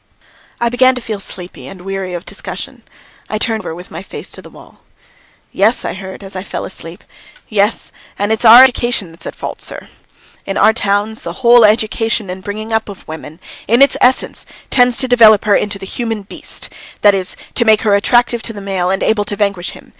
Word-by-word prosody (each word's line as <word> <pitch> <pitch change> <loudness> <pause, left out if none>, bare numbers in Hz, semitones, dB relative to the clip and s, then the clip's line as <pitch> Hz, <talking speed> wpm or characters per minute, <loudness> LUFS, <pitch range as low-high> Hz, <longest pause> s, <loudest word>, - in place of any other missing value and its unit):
I 235 - +1
began 255 +2 +4
to - - -3
feel 215 -3 -5
sleepy 180 -2 -8
and 190 -2 -10
weary 190 -1 -4
of 175 - -7
discussion. - - -7 0.5
I 215 - -2
turned 220 0 -1
over 160 - -6
with 180 +1 -12
my - - -6
face - - -9
to - - -9
the - - -13
wall. - - -17 0.7
"Yes," 215 +5 +1
I - - -2
heard 190 +1 -9
as 195 0 -10
I 185 - -3
fell - - -5
asleep - - -9 0.4
"yes, 210 +1 0 0.3
and 205 +2 -1
it's 220 - 0
our 235 +2 +10
education 240 -7 +1
that's 165 - -12
at - - -7
fault, - - -6
sir. - - -8 0.5
In 195 - -4
our 220 - +5
towns, 210 0 0
the 260 - -7
whole 240 0 +7
education 220 -1 +1
and 185 +1 -8
bringing 215 +2 -5
up 220 -1 0
of 200 - -11
women 160 0 -9 0.3
in 235 +5 +5
its 280 - +3
essence 255 +1 +2 0.3
tends 245 -2 +4
to 260 - -1
develop 225 -4 +6
her 205 -1 +4
into 205 -1 0
the 195 - -9
human 225 0 -3
beast 195 - -6 0.3
that 205 -1 +6
is, 190 -1 -1 0.2
to 235 - +3
make 220 -2 +4
her 210 -2 +3
attractive 235 +3 +2
to 225 - -2
the 205 - -8
male 190 -2 -2
and 190 0 0
able 215 -2 +1
to 205 0 -3
vanquish 200 -3 -1
him. - - -13
210 Hz, 210 wpm, -15 LUFS, 195-230 Hz, 0.7 s, our